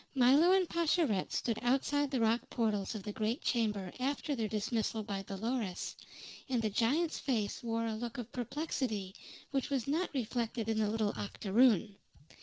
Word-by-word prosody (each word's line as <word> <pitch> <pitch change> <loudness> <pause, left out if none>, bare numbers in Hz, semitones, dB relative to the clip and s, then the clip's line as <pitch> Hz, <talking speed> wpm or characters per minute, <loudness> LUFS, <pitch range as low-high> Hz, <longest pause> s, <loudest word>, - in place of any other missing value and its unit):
Milo 275 +7 +6
and 375 -1 +4
Pascherette 325 - +1
stood 230 -3 -1
outside 275 +3 +2
the 265 -2 0
rock 230 +1 +3
portals 215 -3 0
of 205 - -5
the 210 - -4
great 220 +7 -2
chamber 210 -6 0
after 280 +2 -1
their 225 -3 -1
dismissal 220 +1 -1
by 200 -2 -3
Dolores, 200 0 -3 0.5
and 250 -2 +1
the 220 -2 0
giant's 285 - +1
face 220 -7 -1
wore 230 -1 -1
a 225 - -1
look 230 +1 -5
of 240 -1 -6
perplexity 245 - -2 0.4
which 270 -2 -1
was 270 -4 -1
not 325 +6 +1
reflected 235 -2 -2
in 220 -1 +1
the 210 -1 +2
little 215 -1 0
octoroon. 205 0 +2
230 Hz, 165 wpm, -33 LUFS, 215-265 Hz, 0.5 s, Milo